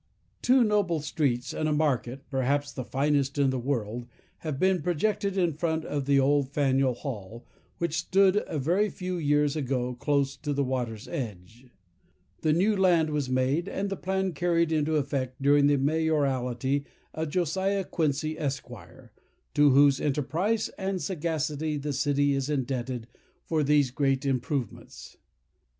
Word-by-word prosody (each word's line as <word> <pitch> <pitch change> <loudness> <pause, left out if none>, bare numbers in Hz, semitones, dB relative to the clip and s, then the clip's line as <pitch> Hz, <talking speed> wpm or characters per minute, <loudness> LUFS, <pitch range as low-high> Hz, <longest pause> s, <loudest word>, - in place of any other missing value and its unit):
Two 255 0 +5
noble 205 -6 +1
streets, 140 -4 -1
and 155 - -1
a - - 0
market, 135 -3 -1
perhaps 140 +2 0
the 130 - -5
finest 140 +1 0
in 140 -2 +3
the 130 - -2
world, 120 -2 -3 0.3
have 155 -4 -4
been 185 +1 +2
projected 195 +4 0
in 175 -4 +2
front 160 +1 -1
of 145 -2 -2
the 140 0 +4
old 140 0 +2
Faneuil 135 -3 +2
Hall, 115 -3 -7 0.3
which 170 -1 -1
stood 190 +2 +3
a 160 - -3
very 180 +10 +1
few 180 -1 -4
years 145 -1 +2
ago 125 -4 -1
close 140 +1 0
to 145 -2 -3
the 140 0 +1
water's 125 -3 -3
edge. 110 0 -7 0.7
The 155 - +2
new 195 +7 +3
land 175 -5 +3
was 145 -3 -1
made, 130 +8 +1
and 200 0 -3
the - - -1
plan 190 0 -1
carried 170 +1 +1
into 155 0 +1
effect 135 -3 -2
during 140 +1 +4
the 145 0 +3
mayoralty 140 -3 0 0.3
of 160 -1 -3
Josiah 190 +4 0
Quincy, 155 -2 -1
Esq., 140 -4 -3 0.8
to 145 0 +5
whose 140 0 +5
enterprise 155 - 0
and 190 -1 -2
sagacity 155 -4 -2
the 145 0 -3
city 145 +1 +1
is 135 +1 -1
indebted 130 -4 -2 0.4
for 160 -2 0
these 145 -3 +3
great 135 0 0
improvements. 130 -2 -3
145 Hz, 150 wpm, -27 LUFS, 135-165 Hz, 0.8 s, Two